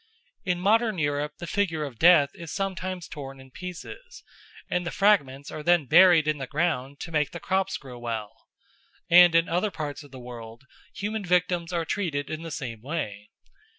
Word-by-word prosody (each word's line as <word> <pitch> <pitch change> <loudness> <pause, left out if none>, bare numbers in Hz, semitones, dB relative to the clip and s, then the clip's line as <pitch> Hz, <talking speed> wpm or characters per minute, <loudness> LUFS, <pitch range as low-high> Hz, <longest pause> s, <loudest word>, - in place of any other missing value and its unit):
In 180 -2 0
modern 215 +2 +2
Europe 145 -1 -1
the 175 - -7
figure 170 -4 -1
of 125 -6 -9
Death 160 -5 +6
is 170 -1 -9
sometimes 185 -2 -3
torn 135 -3 -8
in 130 0 -15
pieces, 180 - -9 0.4
and 180 - -1
the 175 - -3
fragments 145 -11 +2
are 155 - -6
then 170 -1 +3
buried 170 +1 +6
in 155 -1 0
the 135 - -5
ground 145 -3 -1
to 170 - -6
make 150 -3 +1
the 170 - -8
crops 190 +2 0
grow 125 -3 -11
well, 115 -2 -6 0.6
and 175 -1 +8
in 165 0 +4
other 180 +6 0
parts 150 -6 -5
of 145 - -14
the 130 - -11
world 120 -1 -10 0.3
human 210 +1 -3
victims 180 -1 +1
are 170 -2 -1
treated 160 -9 -2
in 155 0 -4
the 165 - -6
same 130 -8 -6
way. 110 -8 -5
165 Hz, 185 wpm, -26 LUFS, 140-180 Hz, 0.6 s, and